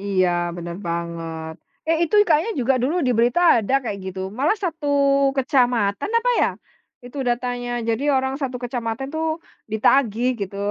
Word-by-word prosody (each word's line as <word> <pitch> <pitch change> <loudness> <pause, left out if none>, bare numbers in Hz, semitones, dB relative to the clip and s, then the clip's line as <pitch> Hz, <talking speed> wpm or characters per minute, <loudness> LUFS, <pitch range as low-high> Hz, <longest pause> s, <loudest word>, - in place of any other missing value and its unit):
Iya, 195 -2 +1 0.3
benar 170 0 -6
banget. 165 -1 -4 0.4
Eh 330 - +3
itu 335 - -3
kayaknya 325 +8 +2
juga 260 +2 +2
dulu 280 +6 +1
di 250 - +3
berita 240 +8 +3 0.2
ada 210 - -3
kayak 210 -5 -4
gitu, 190 0 -5 0.2
malah 305 +11 +2
1 320 -3 -3 0.5
kecamatan, 245 - +1
apa - - +1
ya, - - +4 0.6
itu 250 +3 -9
datanya, 245 0 -2 0.2
jadi 230 +3 0
orang 265 0 0
1 255 -2 -2
kecamatan 245 +1 -3
tuh, 320 0 -1 0.5
ditagih 235 +1 +2
gitu 200 0 -4
245 Hz, 150 wpm, -22 LUFS, 200-270 Hz, 0.6 s, ya